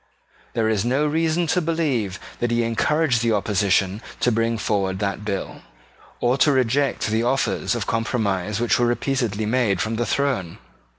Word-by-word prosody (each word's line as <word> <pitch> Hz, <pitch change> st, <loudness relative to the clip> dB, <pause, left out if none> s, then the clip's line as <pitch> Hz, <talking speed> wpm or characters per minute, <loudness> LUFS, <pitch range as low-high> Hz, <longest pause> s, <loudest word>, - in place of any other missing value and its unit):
There 110 Hz, -1 st, +1 dB
is 110 Hz, -3 st, +1 dB
no 130 Hz, +5 st, +1 dB
reason 160 Hz, +3 st, +1 dB
to 175 Hz, +3 st, +1 dB
believe 145 Hz, -, -1 dB, 0.2 s
that 120 Hz, -, 0 dB
he 120 Hz, 0 st, +1 dB
encouraged 125 Hz, +3 st, +1 dB
the 115 Hz, -1 st, +2 dB
opposition 100 Hz, -1 st, +1 dB, 0.2 s
to 125 Hz, -, +3 dB
bring 115 Hz, 0 st, 0 dB
forward 100 Hz, -3 st, -1 dB
that 100 Hz, 0 st, -2 dB
bill 100 Hz, -2 st, -4 dB, 0.6 s
or 125 Hz, +3 st, +1 dB
to 150 Hz, -, +5 dB
reject 135 Hz, +1 st, +1 dB
the 110 Hz, +1 st, +1 dB
offers 130 Hz, +3 st, 0 dB
of -, -, -2 dB
compromise 105 Hz, -3 st, -1 dB
which 120 Hz, 0 st, +2 dB
were 120 Hz, -, +3 dB
repeatedly 120 Hz, -4 st, -1 dB
made 110 Hz, -4 st, +1 dB
from 110 Hz, +1 st, -1 dB
the 120 Hz, -, 0 dB
throne. 125 Hz, -13 st, -1 dB
115 Hz, 165 wpm, -22 LUFS, 105-135 Hz, 0.6 s, to